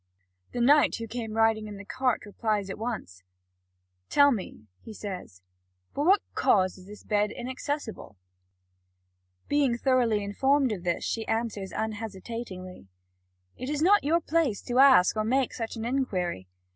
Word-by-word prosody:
The 245 - -3
knight 290 +4 +5
who 230 - -5
came 225 -1 -5
riding 225 -1 +2
on 205 -1 -8
the 200 - -10
cart 255 +1 -1
replies 205 -1 -2
at 190 - -7
once: 215 - -5 0.9
"Tell 285 0 +5
me," 190 - -5 0.2
he 220 - -10
says, 185 - -8 0.5
"for 285 - -1
what 390 +2 +5
cause 185 -1 +2
this 210 +1 -12
bed 210 0 +1
is - - -10
inaccessible." 255 - -5 1.3
Being 280 -5 +2
thoroughly 240 -5 +2
informed 265 +6 +2
of 190 -5 -4
this, 175 -1 -1
she 225 -1 -3
answers 225 -4 -2
unhesitatingly: 210 - -6 0.7
"It 255 - -5
is 300 +1 -1
not 410 +4 +5
your 330 +4 +2
place 310 - 0
to 245 +1 0
ask 260 -10 +6
or 215 - 0
make 255 +3 +1
such 225 -1 -5
an 225 0 -5
inquiry. 185 - -2
225 Hz, 150 wpm, -27 LUFS, 200-260 Hz, 1.3 s, ask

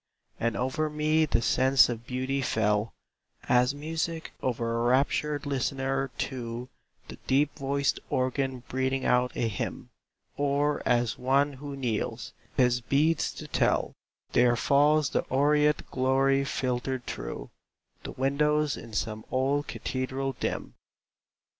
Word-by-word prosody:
And 115 0 0
over 130 +5 -1
me 155 +1 +2
the 120 - +1
sense 130 +2 +5
of 115 -1 -5
beauty 130 +2 -1
fell, 110 -3 +1 0.6
As 125 +2 +3
music 160 +2 -3
over 115 -2 -1
a 115 - 0
raptured 145 +3 +1
listener 135 0 -1
to 120 -1 -4 0.4
The - - -9
deep 145 +2 +2
voiced 140 0 0
organ 130 0 -1
breathing 130 +1 -1
out 125 0 +3
a 115 - 0
hymn; 100 -5 -4 0.5
Or 145 +1 +1
as 120 -2 +2
on - - -13
one 140 +3 +3
who 140 +1 -7
kneels, 120 -6 -3 0.2
his 125 -1 +3
beads 150 +6 +2
to - - -8
tell, - - +1 0.4
There 120 -1 +4
falls 145 +3 +3
the - - +2
aureate 150 +2 +2
glory 135 +1 +2
filtered 130 -1 -2
through - - -6 0.5
The - - -7
windows 150 +2 +1
in 115 0 -10
some 110 0 -2
old 140 +3 0
cathedral 130 +1 -3
dim. - - -3
135 Hz, 130 wpm, -28 LUFS, 125-145 Hz, 0.6 s, sense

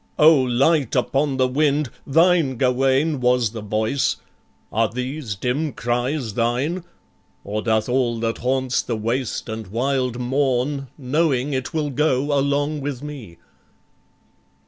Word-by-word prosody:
O 155 +2 +8
light 130 +2 +2
upon 135 +2 +1
the 130 -1 +3
wind, 145 0 +1 0.2
Thine, 165 -3 +3
Gawain, 135 +4 +2
was 125 -3 +2
the 110 -1 -6
voice 110 +6 0 0.6
are 110 0 +2
these 125 -1 -4
dim 130 +8 -1
cries 120 0 -2
Thine? 125 - 0 0.6
or 105 +2 -3
doth 110 -1 +1
all 120 -2 0
that 115 0 -1
haunts 130 0 0
the 115 - -3
waste 120 +4 -2
and 110 -2 -5
wild 125 +3 -1
Mourn, 135 +2 0
knowing 140 0 0
it 130 -1 -2
will 155 -3 -1
go 145 0 +1
along 145 +2 0
with 140 -2 -4
me?" 130 - -8
130 Hz, 130 wpm, -22 LUFS, 120-145 Hz, 0.6 s, O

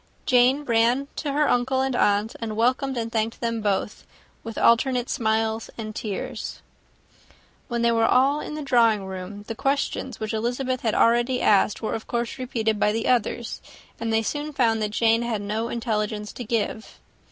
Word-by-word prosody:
Jane 255 +3 +4
ran 240 +3 +2
to 290 - -2
her 295 +1 +2
uncle 260 +2 +1
and 265 -1 0
aunt, 205 0 +2
and 220 -2 -4
welcomed 255 +3 +1
and 230 -1 -3
thanked 225 0 -1
them 230 -1 -2
both, 205 0 -1 0.4
with 225 0 -7
alternate 245 +1 +3
smiles 220 -2 0
and 215 -2 -6
tears. 210 -4 -5 1.0
When 235 -1 -2
they 235 - +4
were 225 -1 +3
all 275 +4 +3
in 300 - -6
the 305 - -5
drawing 230 -6 +3
room, 190 +2 -7
the 225 - -5
questions 270 -1 -2
which 215 0 -3
Elizabeth 245 +3 -1
had 220 -2 0
already 240 +2 +3
asked 205 +1 +3
were 220 - -1
of 220 - -5
course 235 +1 -3
repeated 225 -4 -1
by 210 - +3
the 225 +1 -2
others, 240 -1 0 0.4
and 230 0 -2
they 225 0 +2
soon 295 +6 -3
found 230 -5 +2
that 210 - 0
Jane 225 +2 +2
had 235 -3 -1
no 220 +3 -2
intelligence 215 -3 -2
to 245 - -6
give. 225 +1 -3
230 Hz, 175 wpm, -24 LUFS, 220-250 Hz, 1.0 s, Jane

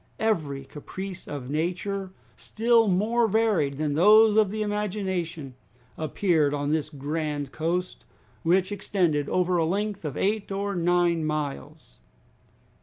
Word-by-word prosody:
Every 150 -11 -1
caprice 185 +7 -8
of 140 -2 -6
nature, 185 +5 -2 0.2
still 230 0 +2
more 220 +5 +2
varied 205 -10 +1
than 150 -1 -1
those 210 +6 +6
of 215 -2 +4
the 215 +2 -2
imagination, 190 -8 -3 0.4
appeared 155 -2 +1
on 145 0 -2
this 155 -1 0
grand 145 -1 -3
coast, 175 +4 -2 0.4
which 185 +3 +2
extended 175 -7 0
over 180 0 +1
a 165 - +2
length 205 +3 -2
of 150 -3 -4
eight 205 0 -1
or 200 +1 -2
nine 175 -1 +2
miles. 150 0 -5
175 Hz, 125 wpm, -26 LUFS, 150-205 Hz, 0.4 s, those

